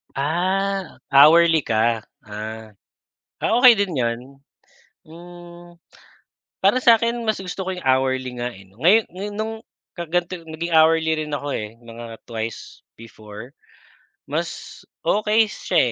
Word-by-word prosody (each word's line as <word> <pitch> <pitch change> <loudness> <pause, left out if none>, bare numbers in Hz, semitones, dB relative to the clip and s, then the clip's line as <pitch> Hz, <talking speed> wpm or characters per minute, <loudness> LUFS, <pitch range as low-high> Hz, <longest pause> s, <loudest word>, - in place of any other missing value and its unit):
Ah, 185 +6 -1
hourly 160 +4 +7
ka, 115 0 +1 0.2
ah. 110 +1 -8 0.7
Ah, - - +1
okey 250 -2 +9
din 200 -3 0
'yon, 115 -1 0 0.9
hmm. 175 +1 -13 0.9
Para 225 +7 +4
sa'kin 235 0 +3
mas 215 - +2
gusto 185 +1 -6
ko - - -2
yung 180 - -9
hourly 130 -1 -2
nga, 120 - -1
eh 100 - -15
'no, 95 +1 -25
ngayo 195 +7 +6 0.2
ngayon 205 +2 -5
nung 220 +1 -3 0.4
ka 170 - -4
ganito 175 +2 -1
naging 165 +2 -5
hourly 160 0 +3
rin 150 -1 -6
ako, 145 - -6 0.2
eh, 105 +2 -11
mga 115 +1 -9 0.2
twice 115 -1 -7 0.2
before. 110 +1 -12 0.8
Mas - - -5 0.2
okey 215 +1 +2
siya, - - -2
165 Hz, 130 wpm, -22 LUFS, 120-190 Hz, 0.9 s, okey